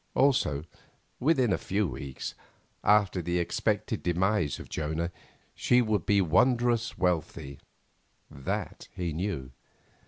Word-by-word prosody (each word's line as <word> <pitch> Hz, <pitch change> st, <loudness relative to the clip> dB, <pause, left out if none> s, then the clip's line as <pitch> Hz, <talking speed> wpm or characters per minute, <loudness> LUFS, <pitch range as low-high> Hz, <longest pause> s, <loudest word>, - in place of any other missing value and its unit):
Also, 100 Hz, -, +3 dB, 0.6 s
within 130 Hz, -5 st, +3 dB
a -, -, 0 dB
few 100 Hz, +1 st, 0 dB
weeks, 70 Hz, -4 st, -6 dB, 0.5 s
after 100 Hz, -3 st, +4 dB
the 85 Hz, +1 st, -1 dB
expected 85 Hz, -, 0 dB
demise 90 Hz, -2 st, +1 dB
of -, -, -9 dB
Jonah, 80 Hz, +3 st, -2 dB, 0.4 s
she 125 Hz, -, +3 dB
would 110 Hz, -5 st, +1 dB
be 100 Hz, -1 st, +4 dB
wondrous 120 Hz, +6 st, +2 dB
wealthy—that 70 Hz, -5 st, -4 dB
he 85 Hz, -3 st, -2 dB
knew. 80 Hz, -7 st, -3 dB
90 Hz, 105 wpm, -29 LUFS, 80-110 Hz, 0.6 s, after